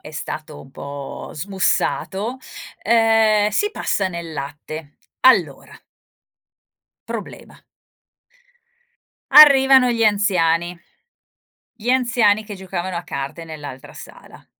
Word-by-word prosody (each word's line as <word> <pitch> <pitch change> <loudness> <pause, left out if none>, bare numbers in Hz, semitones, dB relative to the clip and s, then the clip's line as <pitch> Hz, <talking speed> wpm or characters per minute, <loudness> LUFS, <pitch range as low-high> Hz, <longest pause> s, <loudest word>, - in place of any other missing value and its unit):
è 150 - -12
stato 155 -1 -7
un 135 - -15
po' 140 0 -8
smussato, 195 - -2 0.4
ehm, 225 -2 +3
si 415 - 0
passa 195 - -2
nel 170 -2 -7
latte, 145 +1 -8 0.2
allora 185 - +2 1.3
problema. - - -9 1.7
Arrivano 270 -4 +7
gli 230 -1 0
anziani, 180 -4 +1 0.9
gli 235 +1 -4
anziani 235 -4 +2
che 205 -1 -9
giocavano 185 -1 -5
a 170 - -4
carte 140 +4 -6
nell'altra 145 -5 -10
sala. - - -14
190 Hz, 95 wpm, -20 LUFS, 155-225 Hz, 1.7 s, Arrivano